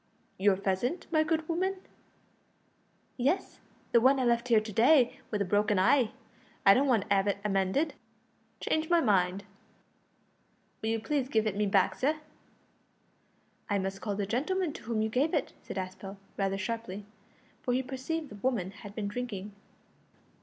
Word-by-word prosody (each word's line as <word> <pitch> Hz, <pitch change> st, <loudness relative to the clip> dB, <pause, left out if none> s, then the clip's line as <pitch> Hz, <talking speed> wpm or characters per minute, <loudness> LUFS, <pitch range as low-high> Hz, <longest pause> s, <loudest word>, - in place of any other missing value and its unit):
"Your 200 Hz, 0 st, +4 dB
pheasant, 195 Hz, -, -1 dB
my 310 Hz, -2 st, +4 dB
good 315 Hz, 0 st, -1 dB
woman?" 370 Hz, +3 st, 0 dB, 1.4 s
"Yes, 285 Hz, +10 st, 0 dB, 0.3 s
the 235 Hz, -, +5 dB
one 265 Hz, +3 st, +5 dB
I -, -, +1 dB
left 235 Hz, 0 st, +2 dB
here 230 Hz, -3 st, +5 dB
to 215 Hz, 0 st, -7 dB
day 245 Hz, +3 st, +4 dB
wi' 210 Hz, -, 0 dB
the 200 Hz, -, 0 dB
broken 205 Hz, +2 st, +2 dB
heye. 230 Hz, +5 st, +4 dB, 0.6 s
I 195 Hz, -, +9 dB
don't 275 Hz, +6 st, +3 dB
want 230 Hz, -7 st, +2 dB
to 200 Hz, -, +3 dB
'ave 195 Hz, +1 st, +2 dB
it 210 Hz, 0 st, -3 dB
mended; 195 Hz, +11 st, +1 dB, 0.7 s
changed 315 Hz, 0 st, -1 dB
my 345 Hz, -1 st, +5 dB
mind. 195 Hz, -, +2 dB, 1.4 s
Will 220 Hz, -, -1 dB
you 225 Hz, 0 st, 0 dB
please 265 Hz, +3 st, -1 dB
give 220 Hz, -3 st, +2 dB
it 210 Hz, -3 st, -1 dB
me 210 Hz, 0 st, +1 dB
back, 195 Hz, -1 st, +3 dB
sir?" 300 Hz, +4 st, 0 dB, 1.5 s
"I 205 Hz, -, +2 dB
must 195 Hz, 0 st, -3 dB
call 205 Hz, -2 st, -2 dB
the 200 Hz, 0 st, -1 dB
gentleman 300 Hz, -, -1 dB
to -, -, -10 dB
whom 220 Hz, -1 st, 0 dB
you 220 Hz, -, 0 dB
gave 280 Hz, +9 st, +1 dB
it," 290 Hz, -, -1 dB
said -, -, -7 dB
Aspel, 190 Hz, +1 st, -6 dB, 0.2 s
rather 195 Hz, -1 st, 0 dB
sharply, 205 Hz, -1 st, -4 dB, 0.6 s
for 250 Hz, -, -1 dB
he 260 Hz, -, 0 dB
perceived 275 Hz, +4 st, -4 dB
the 210 Hz, -, -9 dB
woman 225 Hz, -8 st, 0 dB
had 205 Hz, 0 st, -11 dB
been 210 Hz, -2 st, -2 dB
drinking. 210 Hz, -3 st, -5 dB
225 Hz, 165 wpm, -30 LUFS, 200-270 Hz, 1.5 s, I